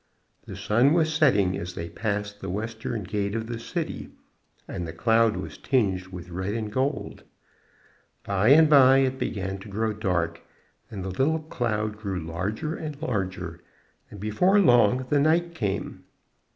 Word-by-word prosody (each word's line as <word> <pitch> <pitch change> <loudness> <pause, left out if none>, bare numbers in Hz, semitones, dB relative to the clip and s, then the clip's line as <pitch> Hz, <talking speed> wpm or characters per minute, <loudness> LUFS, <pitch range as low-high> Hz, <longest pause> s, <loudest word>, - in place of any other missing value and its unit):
The - - -7
sun 120 +7 +3
was 160 -2 +2
setting 105 - +3
as 90 0 -6
they 85 - -5
passed 105 +1 -3
the 95 - -5
western 110 +2 -4
gate 100 +2 -2
of 115 0 -2
the 115 0 -5
city, - - -4 0.6
and 85 - -5
the 80 - -6
cloud 115 +5 +3
was - - -7
tinged 95 -8 0
with 90 -1 -9
red 95 +4 -3
and 110 -2 -3
gold. 135 +5 -2 1.0
By 100 +1 0
and 155 +3 +7
by 135 -3 +7
it 130 -1 +1
began 95 -2 -3
to 100 - -11
grow 110 +2 -1
dark, 90 -5 -1 0.5
and 100 -4 -6
the - - -3
little 145 - +1
cloud 110 -7 -2
grew 100 -4 -3
larger 95 - -3
and 150 -3 -6
larger, 95 - -3 0.5
and 105 - -11
before 180 - +3
long 125 - +4
the 145 - +4
night 170 +3 +2
came. 100 - -3
110 Hz, 160 wpm, -26 LUFS, 95-130 Hz, 1.0 s, and